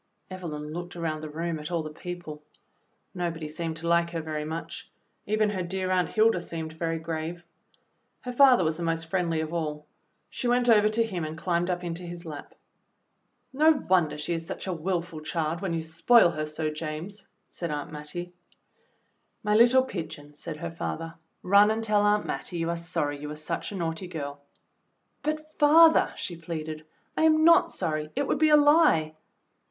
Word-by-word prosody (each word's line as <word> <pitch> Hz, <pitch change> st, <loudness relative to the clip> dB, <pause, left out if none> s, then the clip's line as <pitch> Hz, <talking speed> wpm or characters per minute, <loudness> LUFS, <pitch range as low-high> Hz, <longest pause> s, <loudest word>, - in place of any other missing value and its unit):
Evelyn 155 Hz, -5 st, -6 dB
looked 175 Hz, +1 st, -6 dB
around 160 Hz, -3 st, -3 dB
the 155 Hz, -, -6 dB
room 165 Hz, +1 st, -3 dB
at 150 Hz, -, -6 dB
all 170 Hz, -2 st, -1 dB
the 155 Hz, -, -6 dB
people. 175 Hz, -3 st, -7 dB, 0.7 s
Nobody 170 Hz, -3 st, -3 dB
seemed 160 Hz, +1 st, -4 dB
to 165 Hz, +1 st, -5 dB
like 170 Hz, 0 st, +3 dB
her 170 Hz, -1 st, -3 dB
very 155 Hz, -1 st, -4 dB
much; 160 Hz, +2 st, -6 dB, 0.4 s
even 215 Hz, 0 st, +2 dB
her 190 Hz, -3 st, -2 dB
dear 185 Hz, +1 st, -2 dB
Aunt 180 Hz, -1 st, +2 dB
Hilda 220 Hz, -4 st, +3 dB
seemed 160 Hz, -2 st, -6 dB
very 165 Hz, 0 st, -2 dB
grave. 165 Hz, +1 st, -5 dB, 0.8 s
Her 250 Hz, -, -5 dB
father 255 Hz, -5 st, +6 dB
was 160 Hz, -1 st, 0 dB
the -, -, -6 dB
most 165 Hz, -1 st, -1 dB
friendly 165 Hz, -2 st, 0 dB
of 160 Hz, +1 st, -5 dB
all. 150 Hz, -3 st, -3 dB, 0.4 s
She 250 Hz, -, -4 dB
went 245 Hz, 0 st, +2 dB
over 215 Hz, -2 st, +6 dB
to 225 Hz, +2 st, +1 dB
him 190 Hz, -7 st, -4 dB
and 155 Hz, +1 st, -5 dB
climbed 175 Hz, 0 st, 0 dB
up 180 Hz, 0 st, -2 dB
into 170 Hz, 0 st, -4 dB
his 175 Hz, 0 st, -8 dB
lap. 150 Hz, -3 st, -9 dB, 1.0 s
"No 310 Hz, +4 st, +5 dB
wonder 185 Hz, -, +1 dB
she 150 Hz, +3 st, -2 dB
is 165 Hz, 0 st, -3 dB
such 190 Hz, -, -5 dB
a 190 Hz, -, -2 dB
willful 170 Hz, -1 st, -3 dB
child 160 Hz, +1 st, -2 dB
when 195 Hz, -3 st, -2 dB
you 165 Hz, -, -1 dB
spoil 170 Hz, +5 st, +5 dB
her 155 Hz, -2 st, -3 dB
so, 155 Hz, 0 st, -2 dB
James," 165 Hz, +6 st, -6 dB, 0.2 s
said 170 Hz, -, -5 dB
Aunt 145 Hz, -1 st, -4 dB
Mattie. 155 Hz, +4 st, -7 dB, 1.1 s
"My 210 Hz, 0 st, +2 dB
httle 250 Hz, +3 st, +5 dB
pigeon," 155 Hz, -, -7 dB
said 150 Hz, +1 st, -7 dB
her 170 Hz, +1 st, -5 dB
father. 165 Hz, 0 st, -5 dB, 0.3 s
"Run 200 Hz, +3 st, +6 dB
and 220 Hz, +1 st, -1 dB
tell 210 Hz, -2 st, +3 dB
Aunt 205 Hz, 0 st, +2 dB
Mattie 175 Hz, -, -4 dB
you 165 Hz, 0 st, -1 dB
are -, -, -1 dB
sorry 150 Hz, -4 st, -2 dB
you 150 Hz, -, -6 dB
were 150 Hz, -, -5 dB
such 155 Hz, +5 st, -4 dB
a -, -, -6 dB
naughty 165 Hz, 0 st, -3 dB
girl." 145 Hz, -4 st, -6 dB, 0.8 s
"But, 310 Hz, 0 st, -3 dB
father," 320 Hz, +2 st, +6 dB
she 175 Hz, -, -5 dB
pleaded, 155 Hz, -2 st, -6 dB, 0.3 s
"I -, -, 0 dB
am 315 Hz, 0 st, +5 dB
not 335 Hz, 0 st, +6 dB
sorry; 155 Hz, -3 st, -2 dB
it 285 Hz, +2 st, 0 dB
would -, -, 0 dB
be 310 Hz, 0 st, +5 dB
a 300 Hz, -, +7 dB
lie." 290 Hz, -, +4 dB
170 Hz, 190 wpm, -27 LUFS, 155-200 Hz, 1.1 s, a